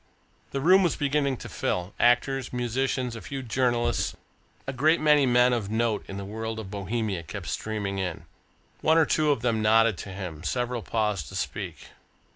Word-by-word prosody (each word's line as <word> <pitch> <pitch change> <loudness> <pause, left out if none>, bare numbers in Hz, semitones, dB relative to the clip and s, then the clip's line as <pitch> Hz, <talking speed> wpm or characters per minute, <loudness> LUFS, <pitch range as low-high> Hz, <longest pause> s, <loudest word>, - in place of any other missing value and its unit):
The 135 - -3
room 185 +6 +6
was 175 -4 +2
beginning 140 -2 0
to - - -8
fill 90 +2 -2
actors, 125 +2 +2
musicians, 125 0 -1
a 115 - -7
few 135 -1 -6
journalists, 120 0 0 0.5
a 135 - -4
great 155 +6 +3
many 150 -3 +4
men 125 0 +4
of 110 -5 -2
note 110 -1 0
in 95 - -6
the 100 - -5
world 110 +2 -4
of 105 -4 -7
Bohemia 105 -1 -2
kept 80 - -7
streaming 100 -3 -3
in. 90 -3 -4 0.6
One 160 +1 +4
or 160 - +5
two 155 0 +2
of 140 -6 +2
them 115 -3 +1
nodded 110 -1 +4
to - - -7
him, 90 -5 -6
several 120 +2 -1
paused 105 - -1
to - - -9
speak. - - -5
120 Hz, 180 wpm, -27 LUFS, 105-135 Hz, 0.6 s, room